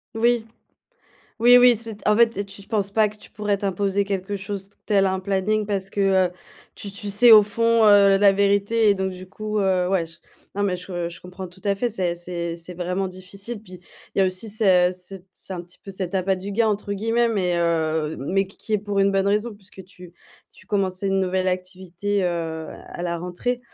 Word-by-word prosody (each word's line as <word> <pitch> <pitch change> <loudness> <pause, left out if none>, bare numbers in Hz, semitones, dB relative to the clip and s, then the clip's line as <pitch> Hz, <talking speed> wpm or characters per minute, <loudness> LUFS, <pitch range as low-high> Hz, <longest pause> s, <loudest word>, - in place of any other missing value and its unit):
Oui, 235 0 +1 0.9
oui, 240 +2 +7
oui. 245 0 +7
C'est 220 -1 -5
en 210 - +5
fait 230 0 +4
et 200 - -2
tu 200 0 -9
penses 205 -3 0
pas 215 +1 +3
que 210 - -13
tu 210 - -15
pourrais 210 -1 -1
t'imposer 200 0 -1
quelque 200 0 -3
chose 195 0 -5 0.2
tel 200 -2 +2
un 190 0 0
planning 200 +2 0
parce 195 -2 -2
que, 200 - -4 0.3
heu, - - -12 0.4
tu 200 - -7
tu 200 +1 -5
sais 225 +4 +8
au 215 -1 +10
fond, 230 +2 +2
heu, 200 -1 +6
la 200 0 +6
vérité 200 +2 +2
et - - +4
donc, 190 0 -2
du 185 0 -10
coup, 215 +2 -4
heu, 185 -2 +1
ouais, 185 -3 +1
j 165 +1 -14 0.4
non, 205 - 0
mais 185 -2 0
je 175 -1 -5
je 170 - -11
comprends 185 +1 -8
tout 180 +2 -19
à 200 -1 +2
fait. 245 +4 0
Ça 185 -5 -1
c'est 170 -1 -4
c'est 170 +2 -7
vraiment 180 +2 -2
difficile. 195 +4 -8
Puis, 185 -4 -13 0.3
il - - -3
y - - +5
a 190 - +4
aussi 185 +4 -2
ce 185 -4 +4
cet 185 0 -6
c'est - - -8
un 175 - -5
petit 175 +1 -14
peu 195 - -11
cet 185 -1 -4
«appât 190 0 +1
du 190 +2 -7
gain», 225 +2 +2
entre 205 -1 -2
guillemets 225 +4 +1
mais, 190 -6 0
heu, 160 -2 0
mais 195 +8 0
qui 195 - -18
qui 220 - -7
est - - +2
pour 205 0 -3
une 195 0 +3
bonne 195 0 +1
raison 210 +3 0
puisque 195 -1 -14
tu 180 -1 -15 0.4
tu - - -19
commençais 195 -2 -1
une 195 0 +1
nouvelle 185 0 0
activité, 185 +2 -3
heu, 165 -2 -3 0.2
à - - -8
la 170 -1 -2
rentrée, 180 +8 -3
195 Hz, 220 wpm, -23 LUFS, 180-210 Hz, 0.9 s, au